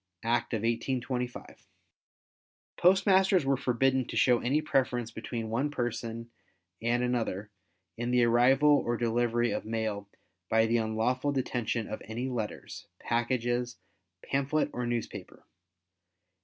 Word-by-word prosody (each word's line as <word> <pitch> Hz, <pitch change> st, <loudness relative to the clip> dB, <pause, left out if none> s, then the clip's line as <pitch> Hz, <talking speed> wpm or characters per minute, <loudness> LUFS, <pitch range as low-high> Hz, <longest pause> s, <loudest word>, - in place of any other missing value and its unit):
(Act 120 Hz, 0 st, 0 dB
of 110 Hz, -, -3 dB
1825). 125 Hz, +1 st, -3 dB, 1.1 s
Postmasters 190 Hz, -1 st, +4 dB
were 135 Hz, 0 st, +3 dB
forbidden 130 Hz, +1 st, +1 dB
to -, -, -4 dB
show 125 Hz, -2 st, +4 dB
any 135 Hz, +5 st, +1 dB
preference 125 Hz, -6 st, 0 dB
between 115 Hz, -2 st, -5 dB
one 130 Hz, +6 st, 0 dB
person 115 Hz, -3 st, -4 dB, 0.5 s
and 120 Hz, +2 st, +1 dB
another 110 Hz, -4 st, -2 dB, 0.5 s
in 120 Hz, +1 st, -2 dB
the 125 Hz, 0 st, +3 dB
arrival 125 Hz, +5 st, +4 dB
or 120 Hz, 0 st, -1 dB
delivery 120 Hz, 0 st, +1 dB
of -, -, -2 dB
mail 110 Hz, -2 st, -3 dB, 0.4 s
by 110 Hz, 0 st, +4 dB
the 115 Hz, +1 st, +2 dB
unlawful 115 Hz, +5 st, 0 dB
detention 120 Hz, -4 st, -1 dB
of -, -, -6 dB
any 120 Hz, +4 st, -4 dB
letters, 115 Hz, -4 st, -5 dB
packages, 120 Hz, 0 st, -1 dB, 0.5 s
pamphlet 140 Hz, +2 st, 0 dB
or 125 Hz, -1 st, -3 dB
newspaper. 120 Hz, -1 st, -5 dB
120 Hz, 120 wpm, -29 LUFS, 115-130 Hz, 1.1 s, Postmasters